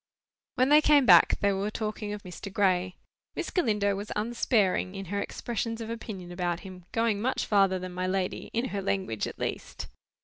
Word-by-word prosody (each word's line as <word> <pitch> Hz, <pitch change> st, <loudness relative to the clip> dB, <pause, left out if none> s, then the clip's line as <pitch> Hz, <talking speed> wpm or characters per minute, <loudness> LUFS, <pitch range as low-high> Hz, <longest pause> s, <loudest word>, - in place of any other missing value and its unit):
When 255 Hz, +2 st, +3 dB
they 300 Hz, +1 st, +7 dB
came 295 Hz, -3 st, +5 dB
back, 175 Hz, -6 st, +7 dB
they 200 Hz, -1 st, +3 dB
were 195 Hz, +2 st, -1 dB
talking 215 Hz, -1 st, -4 dB
of 210 Hz, 0 st, -6 dB
Mr. 185 Hz, +2 st, -8 dB
Gray. 185 Hz, -2 st, +1 dB, 0.4 s
Miss -, -, -3 dB
Galindo 210 Hz, -, +1 dB
was 205 Hz, +2 st, -6 dB
unsparing 210 Hz, -4 st, +1 dB
in 195 Hz, 0 st, -5 dB
her 200 Hz, -, 0 dB
expressions 230 Hz, +1 st, -3 dB
of 225 Hz, 0 st, -5 dB
opinion 200 Hz, -6 st, -7 dB
about 175 Hz, -1 st, -2 dB
him: 185 Hz, -2 st, -11 dB
going 225 Hz, -3 st, +1 dB
much 260 Hz, +3 st, 0 dB
farther 195 Hz, -2 st, +3 dB
than 185 Hz, 0 st, -6 dB
my 185 Hz, +1 st, -2 dB
lady—in 195 Hz, +6 st, -2 dB
her 200 Hz, -, -3 dB
language, 190 Hz, -, -1 dB
at -, -, -8 dB
least. -, -, -4 dB
200 Hz, 180 wpm, -28 LUFS, 185-225 Hz, 0.4 s, they